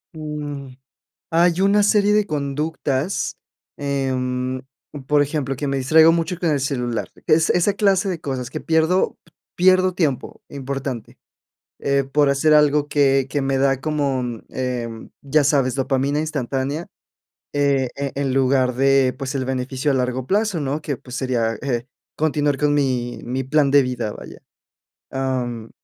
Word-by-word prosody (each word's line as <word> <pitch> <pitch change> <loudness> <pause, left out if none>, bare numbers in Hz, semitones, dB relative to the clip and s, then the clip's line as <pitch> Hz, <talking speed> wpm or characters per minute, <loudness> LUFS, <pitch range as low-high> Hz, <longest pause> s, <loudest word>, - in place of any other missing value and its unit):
Mm. 145 -3 -6 0.6
Hay 170 +2 +3
una 200 +1 +4
serie 205 0 +3
de 210 -1 +3
conductas, 150 +1 -2 0.4
em, 130 -2 -2 0.4
por 150 -1 +4
ejemplo, 140 -2 -2
que 145 - -3
me 135 0 -1
distraigo 160 +5 +6
mucho 170 +1 -1
con 170 -3 0
el 145 -2 +1
celular, 125 -4 -2 0.2
que - - +5
es 160 +1 +2
esa 185 +3 +2
clase 195 -1 +2
de 175 -4 -3
cosas 130 -3 -4
que 155 - -5
pierdo 160 +3 +1 0.4
pierdo 185 0 +4
tiempo, 155 -8 -2
importante, 135 -3 -5 0.6
eh 140 -1 +1
por 145 +1 +2
hacer 150 +3 +3
algo 150 -1 +4
que 135 -2 +3
que 145 - 0
me 135 0 0
da 135 -1 +2
como, 140 -3 -1 0.3
em, 120 -3 -4
¿ya 145 +2 +2
sabes?, 135 -3 +2
dopamina 135 +2 0
instantánea, 145 +1 -2 0.7
eh, 140 -3 +2
e 140 -1 -3
en 135 -1 -1
lugar 130 -1 +2
de, 135 0 +3
pues, 135 0 -4
el 130 -1 -2
beneficio 130 +2 -2
a - - +2
largo 125 0 -1
plazo, 205 -4 +1
¿no? 145 +2 -2
Que, 145 -3 -3
pues, 125 -1 -9
sería 120 -4 0
eh 125 -3 -2 0.3
continuar 150 -2 +1
con 150 0 +2
mi 125 -4 0
mi 130 +2 -3
plan 140 +1 +2
de 140 0 +6
vida, 120 -4 -3
vaya. - - -11 0.7
Am, 125 -4 -3
140 Hz, 155 wpm, -21 LUFS, 130-155 Hz, 0.7 s, distraigo